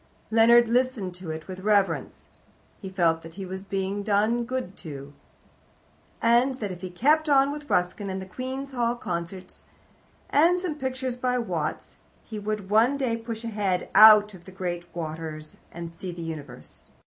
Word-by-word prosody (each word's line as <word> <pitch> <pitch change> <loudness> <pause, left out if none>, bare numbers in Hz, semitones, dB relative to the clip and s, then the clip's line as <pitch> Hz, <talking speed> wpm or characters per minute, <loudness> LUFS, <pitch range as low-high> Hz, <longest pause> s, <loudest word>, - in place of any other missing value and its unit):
Leonard 235 +1 +6
listened 240 -6 0
to 180 -2 -9
it 160 0 -6
with 185 -1 -7
reverence. 195 -7 +1 0.6
He 190 - -6
felt 170 -4 +1
that 165 0 -12
he 195 0 -6
was 190 +1 -6
being 195 +1 -3
done 215 +3 +1
good 250 -6 -4
to, 140 -4 -8 1.1
and 240 +3 +3
that 210 -6 -4
if 180 -1 -8
he 185 - -5
kept 300 - +2
on 275 0 +4
with 295 0 -8
Ruskin, 180 +3 0
and 190 0 -3
the 190 - -6
Queen's 260 +7 -6
Hall 240 -2 0
Concerts, 180 -3 -6 0.7
and 340 +5 +4
some 360 -3 -3
pictures 260 -3 -3
by 250 0 0
Watts, 235 - -3 0.3
he 215 - -7
would 205 -1 -4
one 235 +6 +4
day 255 -4 0
push 230 0 -6
his 230 - -4
head 195 -4 -1
out 210 -1 +8
of 175 -2 -14
the 190 - -11
grey 180 -2 -3
waters 155 -2 -6
and 170 0 -7
see 180 +2 -6
the 170 -1 -7
universe. 145 -6 -8
205 Hz, 170 wpm, -26 LUFS, 180-240 Hz, 1.1 s, out